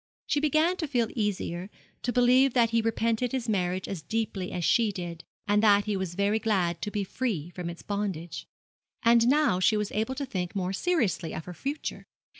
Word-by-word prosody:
She 295 - +1
began 310 +4 +2
to 320 - -2
feel 240 -5 +1
easier, 195 -4 -2 0.3
to 245 - -1
believe 250 +2 +4
that 230 -2 +4
he 230 0 +3
repented 230 +2 0
his 255 -3 -2
marriage 185 -3 0
as 190 -5 -4
deeply 200 0 -3
as 175 -2 -2
she 225 -3 +3
did, 175 -3 -6 0.2
and 205 +1 +3
that 205 -2 +5
he 210 - -1
was 190 -3 -3
very 200 +3 +2
glad 190 -6 0
to 210 - -2
be 205 -1 -2
free 190 - -3
from 180 -1 -5
its 170 - -9
bondage. 195 -5 -4 0.6
And 235 0 +5
now 285 -9 +3
she 215 +4 +3
was 210 -1 -2
able 225 +5 -1
to 280 - -3
think 180 -7 -4
more 185 -1 -1
seriously 225 - 0
of 160 - -6
her 180 - -7
future. 280 - -5
210 Hz, 200 wpm, -28 LUFS, 185-245 Hz, 0.6 s, that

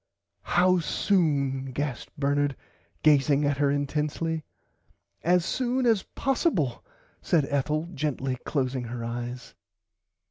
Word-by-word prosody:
How 180 0 +5
soon 145 -7 +1
gasped 140 -2 -4
Bernard 145 0 +1 0.5
gazing 145 -1 +4
at 145 0 +1
her 140 0 +2
intensly. 150 +3 -1 0.8
As 175 0 +3
soon 255 +2 0
as 225 -5 +4
possible 225 - 0 0.4
said 160 -5 +2
Ethel 150 +3 0
gently 135 -3 -1
closing 130 -3 -1
her 115 0 -5
eyes. 120 +1 -5
145 Hz, 105 wpm, -27 LUFS, 135-165 Hz, 0.8 s, How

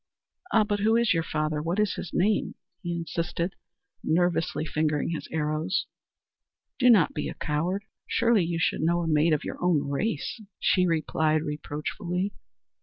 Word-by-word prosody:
"Ah, 220 - +5
but 205 -1 -1
who 220 +2 +3
is 235 -3 +3
your 165 - +1
father? 155 -1 -1
What 170 +6 -1
is 210 -2 +2
his 175 - -6
name?" 205 +3 +1 0.3
he 175 -3 -3
insisted, 170 +1 -2 0.5
nervously 170 -1 +1
fingering 155 -1 0
his 165 -2 -4
arrows. 155 +3 0 0.9
"Do 250 -1 +5
not 205 -9 +5
be - - -3
a - - -7
coward! 175 +7 -1 0.2
Surely 230 -4 +3
you 170 0 -1
should 165 - +1
know 170 +2 +2
a - - -2
maid 155 +1 +3
of 155 -1 +1
your - - -6
own 170 -6 +2
race," 215 - -2 0.2
she 180 -1 +3
replied 155 -1 +1
reproachfully. 170 +6 -3
170 Hz, 160 wpm, -27 LUFS, 155-195 Hz, 0.9 s, Ah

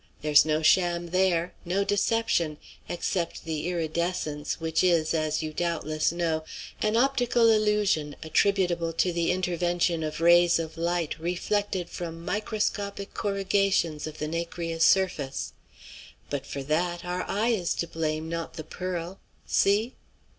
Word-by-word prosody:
There's 150 -1 +6
no 155 0 0
sham 175 +1 +3
there; 180 -1 +1
no 185 +3 0
deception 200 -5 +1 0.3
except 175 0 -2
the 160 0 -3
iridescence, 170 -3 -2
which 160 +1 0
is, 170 -3 +3
as 155 -1 0
you 155 0 -4
doubtless 155 -2 0
know, 165 -2 -1 0.4
an 215 +1 +2
optical 245 -3 +3
illusion 210 -9 +2
attributable 175 -1 +1
to 175 +2 +1
the 170 0 +1
intervention 175 -2 0
of 155 0 -3
rays 175 +1 +5
of 160 -1 -4
light 170 -1 -1
reflected 180 +2 -1
from 165 -1 -7
microscopic 205 -1 -2
corrugations 195 -6 0
of 155 - -8
the 150 - -3
nacreous 165 0 -2
surface. 170 -8 +1 0.8
But 145 -2 -3
for 140 - -5
that 175 +5 -1
our 180 +1 -2
eye 215 +4 +1
is 190 -8 0
to 170 - -2
blame, 155 -1 -2
not 165 0 -4
the 155 - -6
pearl. 180 +2 -5 0.3
See?" 215 +5 +2
170 Hz, 135 wpm, -27 LUFS, 160-190 Hz, 0.8 s, There's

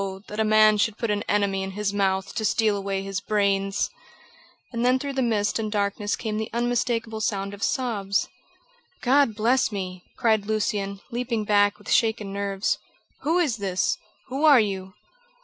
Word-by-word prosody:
that 210 - -6
a - - +4
man 215 -1 +5
should 215 +1 +1
put 230 -3 -1
an 205 0 0
enemy 200 -2 +1
in 190 0 -4
his 210 -1 -1
mouth 195 -1 0
to 220 - -2
steal 215 0 +2
away 195 -1 -2
his 195 0 -3
brains!" 200 -1 +1 0.9
And 235 0 -1
then 250 +1 +4
through 280 +1 -4
the 265 - 0
mist 215 -3 +1
and 215 -1 -2
darkness 205 0 0
came 215 -2 -3
the 220 0 -3
unmistakable 235 -2 -1
sound 200 -2 -1
of 200 - -10
sobs. 205 -6 0 0.8
"God 265 -3 +4
bless 235 +3 +2
me!" 185 -3 -5
cried 220 -3 +2
Lucian, 205 -2 -1
leaping 235 -2 -1
back, 205 -1 +3
with 205 - -8
shaken 220 -3 +2
nerves. 200 -1 -1 0.4
"Who 325 +4 +1
is 295 -10 +1
this? 190 -3 0 0.3
Who 270 +4 -3
are 295 -5 +8
you?" 190 -2 -2
210 Hz, 170 wpm, -25 LUFS, 200-230 Hz, 0.9 s, are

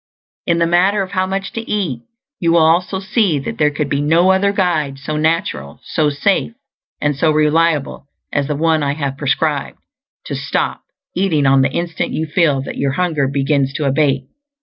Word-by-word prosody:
In 170 - +2
the 170 - +2
matter 185 +4 +2
of 185 - -9
how 185 -1 0
much 195 +1 -3
to 230 - -3
eat, 175 - -1 0.4
you 170 -1 +2
will 165 -2 +5
also 180 +4 +2
see 195 -4 +1
that 135 - -5
there 150 -1 +4
could 145 0 -3
be 140 0 -1
no 165 +5 +4
other 195 +1 +2
guide 165 -8 0
so 145 +3 -5
natural, 150 - -1
so 155 -2 0
safe, 190 +10 0 0.5
and 145 -1 0
so 155 +4 +2
reliable 155 -2 +1 0.3
as 140 -1 0
the 150 - -2
one 160 +1 +1
I 140 0 -1
have 140 -3 -3
prescribed 145 +1 -1 0.5
to - - -5
stop - - -2 0.3
eating 175 -6 +1
on 135 0 +5
the 135 - +2
instant 170 +2 -3
you 160 - -1
feel 150 -4 +1
that - - -7
your 140 -1 0
hunger 160 -5 0
begins 140 0 0
to 150 - -1
abate. 140 -1 +1
155 Hz, 190 wpm, -17 LUFS, 140-175 Hz, 0.5 s, will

